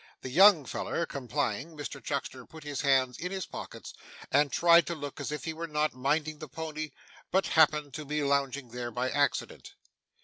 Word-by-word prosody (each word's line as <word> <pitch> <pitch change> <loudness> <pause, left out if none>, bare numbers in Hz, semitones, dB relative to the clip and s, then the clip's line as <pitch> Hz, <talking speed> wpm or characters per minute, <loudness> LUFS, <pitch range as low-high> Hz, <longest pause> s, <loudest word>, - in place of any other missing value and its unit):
The 130 - -5
'young 180 -1 +7
feller' 170 - -2
complying, 140 +2 -3
Mr 145 -1 -6
Chuckster 135 -2 -3
put 160 -1 -12
his 145 -2 -3
hands 135 -3 +2
in 180 +2 -4
his 190 -1 -3
pockets, - - -8 0.4
and 145 0 +3
tried 170 0 +5
to 170 - -2
look 145 -2 -7
as - - -4
if 150 - -4
he 160 - -2
were 165 +1 -5
not 150 0 0
minding 150 +4 -1
the 155 - -7
pony, 155 0 -5 0.4
but 190 +1 +2
happened 150 -3 +3
to 155 +1 -6
be 150 +1 -1
lounging 140 -2 0
there 120 0 -5
by 125 +2 -2
accident. 145 0 -1
150 Hz, 190 wpm, -30 LUFS, 135-160 Hz, 0.4 s, young